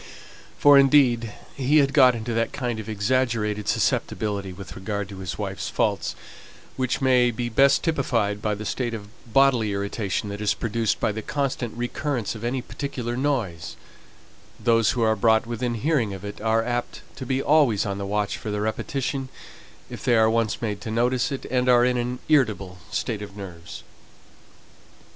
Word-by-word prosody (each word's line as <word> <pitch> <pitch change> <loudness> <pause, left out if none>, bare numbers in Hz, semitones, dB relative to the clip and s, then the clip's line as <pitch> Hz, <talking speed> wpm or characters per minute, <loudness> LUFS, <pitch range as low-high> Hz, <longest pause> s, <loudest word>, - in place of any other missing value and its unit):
For, 145 -1 +7
indeed, 125 -5 +4 0.2
he 140 +3 +2
had 140 -2 +3
got 130 -4 +6
into 115 +1 -4
that 115 0 0
kind 120 -4 -3
of 110 0 -7
exaggerated 110 -1 0
susceptibility 100 -3 -1
with 95 +1 -10
regard 100 +1 -4
to 100 -2 -9
his 85 -4 -5
wife's 95 -2 -4
faults, - - -1 0.6
which 130 0 -1
may 125 -2 +4
be 120 +1 -3
best 135 +4 +4
typified 115 -10 0
by 105 0 0
the 105 +1 -7
state 120 +1 -2
of 100 -2 -9 0.2
bodily 125 -5 +3
irritation 100 0 -2
that 100 +1 -6
is 105 -1 +1
produced 115 0 -1
by - - +1
the 110 +1 -5
constant 125 -3 -3
recurrence 120 -1 -2
of 110 0 -9
any 125 +1 -2
particular 125 -4 -4
noise: 120 - -2 0.8
those 115 -2 +3
who 120 - 0
are 110 0 +3
brought 110 +2 +3
within 120 +1 -2
hearing 115 -5 0
of 95 +1 -9
it, 100 - -7
are 115 +1 +2
apt 120 0 -3 0.2
to 135 - -6
be 130 +1 0
always 140 -8 +3
on 100 -1 -3
the 100 - -3
watch 105 0 -1
for 110 - -6
the 105 0 -2
repetition, 130 +5 -2 0.6
if - - -9
they 120 - +3
are 110 0 +4
once 115 0 0
made 105 -3 -2
to - - -6
notice 120 +4 +1
it, 135 - -5
and 125 0 +1
are 120 -1 +6
in 125 0 +1
an 125 +1 -2
irritable 105 - +1
state 110 -4 -2
of 100 -1 -9
nerves. 90 -4 -9
115 Hz, 175 wpm, -24 LUFS, 105-130 Hz, 0.8 s, For